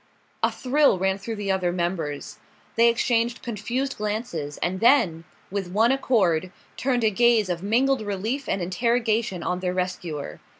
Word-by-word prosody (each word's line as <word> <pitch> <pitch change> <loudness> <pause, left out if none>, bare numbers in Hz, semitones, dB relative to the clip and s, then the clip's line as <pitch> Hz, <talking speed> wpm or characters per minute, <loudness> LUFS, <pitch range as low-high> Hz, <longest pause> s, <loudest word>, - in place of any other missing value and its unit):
A - - +2
thrill 275 -4 +2
ran 190 +1 0
through 225 +3 -5
the 205 -2 -2
other 185 -2 +1
members. 170 -5 -3 0.4
They 235 +1 +5
exchanged 235 0 0
confused 240 +4 -3
glances, 210 - -3
and 185 +2 -2
then, 180 - +3 0.3
with 195 -2 -2
one 220 +6 +3
accord, 185 -10 +1 0.2
turned 250 -3 0
a 220 - +3
gaze 230 -2 +3
of 175 -1 -2
mingled 245 +5 +2
relief 215 +7 -3
and 190 - 0
interrogation 220 0 0
on 180 0 -1
their 180 0 -2
rescuer. 180 -5 -4
205 Hz, 155 wpm, -24 LUFS, 180-235 Hz, 0.4 s, They